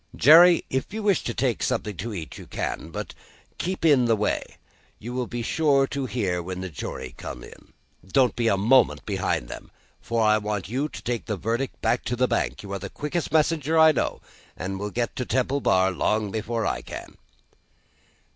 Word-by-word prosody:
"Jerry, 170 +6 +7
if 130 +5 -2
you 220 - -3
wish 200 -3 +2
to 120 - -2
take 125 -2 0
something 110 -5 -1
to 115 +6 -4
eat, 85 -7 -7
you - - -11
can. 80 - -4
But, 80 - -6 0.5
keep 185 -1 -2
in 140 -6 +5
the 115 -1 +3
way. 105 0 0 0.6
You 120 +3 -7
will 125 -1 -2
be 120 -1 -4
sure 140 +1 +3
to 135 -1 -3
hear 95 -8 -1
when 90 +1 -5
the 95 -1 -5
jury 65 -3 -6
come - - -8
in. - - -15 0.3
Don't 125 +4 +3
be 120 -1 0
a 100 - +3
moment 120 +6 +3
behind - - -1
them, - - -9 0.3
for 115 -2 0
I 110 0 +4
want 105 -4 -3
you 135 +8 -2
to - - -9
take 120 -1 -3
the 105 - -2
verdict 115 +7 -2
back 120 - +1
to 125 - -1
the 125 +1 +2
bank. - - -1
You 100 -1 -7
are 100 - -3
the - - -6
quickest 150 +3 -3
messenger 160 0 +2
I 160 0 +8
know, 145 - -2 0.4
and 95 +2 -4
will 105 +1 -3
get 120 +3 -2
to 125 - -1
Temple 130 +3 0
Bar 95 -3 +3
long 105 +3 0
before 115 +1 -2
I - - -1
can." - - -9
120 Hz, 205 wpm, -25 LUFS, 105-135 Hz, 0.6 s, I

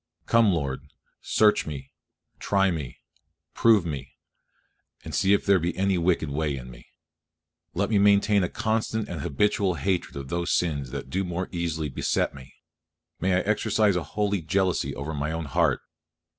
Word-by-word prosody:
Come, 115 -3 +4
Lord! 70 -6 -1 0.4
search 105 -5 +3
me, 70 -3 -7 0.5
try 95 -1 +2
me, 75 -7 -5 0.6
prove 110 -6 +4
me, 70 -5 -6 0.9
and - - -7
see 95 0 +2
if 100 - +1
there 100 -2 +4
be 85 +1 -2
any 95 0 +2
wicked 85 -2 +1
way 75 -1 -1
in 65 0 -9
me. - - -15 0.9
Let 100 +5 0
me 105 - +4
maintain 100 0 +4
a 90 - -1
constant 110 0 -1
and 85 -4 -5
habitual 95 +5 +1
hatred 85 +5 -1
of 70 -1 -6
those 85 +2 -1
sins 70 -7 -2
that 65 0 -7
do 95 +2 0
more 90 0 -3
easily 85 -3 -2
beset 65 - 0
me; 65 -2 -13 0.6
may 90 +1 +1
I 90 - +2
exercise 105 -1 +2
a 90 - 0 0.2
holy 100 -2 +1
jealousy 90 +3 0
over 70 +4 -5
my 75 +1 -2
own 80 0 -3
heart. 70 - +1
90 Hz, 165 wpm, -26 LUFS, 75-100 Hz, 0.9 s, Come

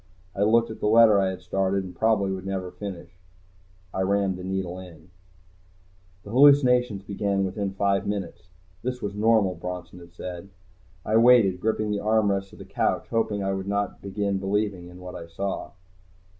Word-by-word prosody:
I 100 - -3
looked 115 +2 +3
at 110 - -9
the - - 0
letter 110 -1 +6
I 95 - +2
had 95 -1 -7
started 95 +1 0
and 90 -1 -9
probably 100 -1 +2
would 95 -1 -4
never 95 -2 -3
finish. 100 -4 -8 0.8
I 95 - -1
rammed 100 0 +1
the 90 - -8
needle 95 -1 -3
in. 85 -2 -13 1.1
The 100 - -10
hallucinations 125 -5 +5
began 100 0 -1
within 95 0 -3
five 100 0 +1
minutes. 95 -4 -5 0.3
This 125 0 -3
was 100 -3 -4
normal, 105 -2 +3
Bronson 90 0 -7
had 85 0 -15
said. 90 +2 -7 0.6
I 110 - +2
waited, 115 -6 +5
gripping 110 0 0
the 105 - -1
armrests 100 -3 +1
of - - -14
the - - -10
couch, - - -1
hoping 105 -3 0
I 95 0 0
would 95 0 -4
not 100 -1 -2
begin 100 0 -2
believing 100 -2 -1
in 90 0 -12
what 90 0 -8
I 85 -2 -8
saw. 95 +4 -4
100 Hz, 175 wpm, -25 LUFS, 95-105 Hz, 1.1 s, letter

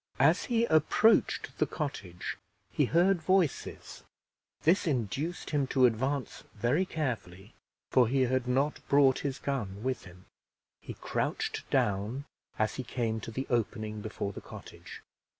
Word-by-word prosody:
As 160 +8 +4
he 235 -1 +2
approached 160 +6 +3
the - - +3
cottage 100 - -5 0.4
he - - +2
heard 175 +2 +3
voices; 180 -3 0 0.6
this 170 +3 +3
induced 140 - -2
him 145 -3 +1
to 130 -1 +4
advance 130 +2 -1
very 125 - +1
carefully, 115 - -4 0.4
for 125 -3 +5
he 135 +3 +1
had 130 0 0
not 135 +4 +1
brought 140 -2 +5
his 140 -2 -3
gun 110 -8 -3
with 130 -5 -2
him. 90 +1 -14 0.5
He - - -8
crouched - - -3
down 105 +7 0 0.3
as 110 0 0
he 130 - -3
came 115 -2 -2
to 115 - -7
the 130 +4 -4
opening 110 -2 -1
before 105 -1 -4
the - - -8
cottage. - - -11
130 Hz, 140 wpm, -30 LUFS, 110-150 Hz, 0.6 s, for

